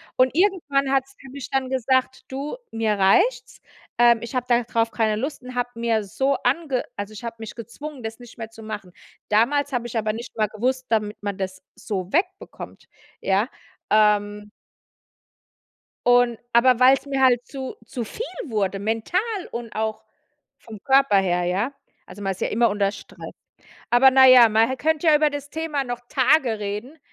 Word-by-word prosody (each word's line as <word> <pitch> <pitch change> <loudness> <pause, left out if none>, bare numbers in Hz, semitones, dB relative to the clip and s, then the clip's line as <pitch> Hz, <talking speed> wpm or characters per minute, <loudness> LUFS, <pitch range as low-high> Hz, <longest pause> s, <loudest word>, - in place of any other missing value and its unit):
Und 255 0 +3
irgendwann 320 -8 +1
hat's 270 0 0
für 270 - -13
mich 275 -1 -8
dann 270 -2 -1
gesagt: 260 0 0
„Du, 275 - -5 0.2
mir 225 -1 0
reicht's, 360 - +2 0.4
ähm. 240 -1 +5
Ich 235 +2 -7
habe 250 -1 -1
darauf 235 -1 +1
keine 220 -2 0
Lust“ 275 +3 -4
und 255 0 -9
habe 245 0 -1
mir 230 -2 0
so 270 +7 0
ange 270 -1 0
also 205 +1 -5
ich 215 +3 -9
habe 230 - -5
mich 220 - -8
gezwungen, 255 +3 -9
das 225 +2 -6
nicht 240 -1 -14
mehr 225 -1 -7
zu 225 -1 -13
machen. 205 -5 -7 0.4
Damals 275 +7 +2
habe 240 -1 -1
ich 230 - -4
aber 215 -1 0
nicht 235 +2 -8
mal 215 -1 +2
gewusst 255 +5 -2
damit 215 -2 0
man 200 -1 -4
das 185 -1 -5
so 190 -3 -5
wegbekommt, 365 +3 -3 0.3
ja? 200 +5 +1 0.4
Ähm 210 -1 +2 1.6
und 245 -1 +4
aber 240 +1 +5
weil's 265 +2 +5
mir 270 -1 -2
halt 245 -2 +4
zu 265 -2 -7
zu 235 +1 -5
viel 450 - -6 0.2
wurde, 200 -5 -1
mental 225 - -1 0.3
und 235 -1 -6
auch 220 0 -2 0.6
vom 215 -3 -12
Körper 270 -7 +4
her, 180 -2 +1
ja? 195 +9 -1 0.3
Also 205 - -11
man 195 -1 -1
ist 185 - -11
ja - - 0
immer 230 0 +2
unter 200 -1 +1
Stress. - - -11 0.6
Aber 255 +2 +6
na 265 0 +7
ja, 250 -3 +8
man 220 +2 +3
hä 260 - -3
könnte 315 +3 0
ja 310 - +6
über 300 0 +2
das 285 0 -6
Thema 310 -4 -2
noch 245 -1 -5
Tage 260 -4 +2
reden. 210 +9 -5
240 Hz, 180 wpm, -23 LUFS, 215-270 Hz, 1.6 s, ja